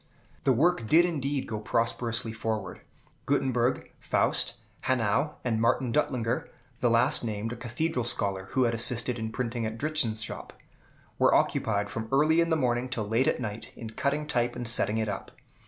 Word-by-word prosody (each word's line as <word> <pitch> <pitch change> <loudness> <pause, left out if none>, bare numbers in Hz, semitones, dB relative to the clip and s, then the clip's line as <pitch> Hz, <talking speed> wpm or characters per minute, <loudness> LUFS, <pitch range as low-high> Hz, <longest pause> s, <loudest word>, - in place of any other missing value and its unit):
The 135 - +5
work 140 -1 +2
did 170 +8 +6
indeed 145 -5 -1
go 110 - -4
prosperously 115 +1 -1
forward. 110 -4 -3 0.5
Gutenberg, 130 -4 +1
Faust, - - +1 0.3
Hanau, 130 +4 +1
and 115 -3 0
Martin 120 +1 +2
Duttlinger, 125 -5 0 0.3
the 120 - +2
last 115 +1 +3
named 110 0 -3
a - - -6
Cathedral 125 +3 -2
scholar 100 -5 0
who 130 - +3
had 115 -1 +2
assisted 120 +1 0
in 110 0 -3
printing 115 0 -2
at 110 +1 -5
Dritzhn's 120 -7 +1
shop, - - -7 0.7
were - - +5
occupied 100 -2 +1
from 110 -1 -4
early 155 +4 +4
in 165 - +1
the 160 - +3
morning 125 -2 0
till 115 -5 -3
late 115 +5 +2
at - - +1
night 110 -2 -5
in 115 -2 -7
cutting 145 +5 -1
type 120 -5 0
and 120 - -4
setting 110 -2 +2
it 110 -1 0
up. 100 -2 -5
120 Hz, 170 wpm, -28 LUFS, 110-130 Hz, 0.7 s, did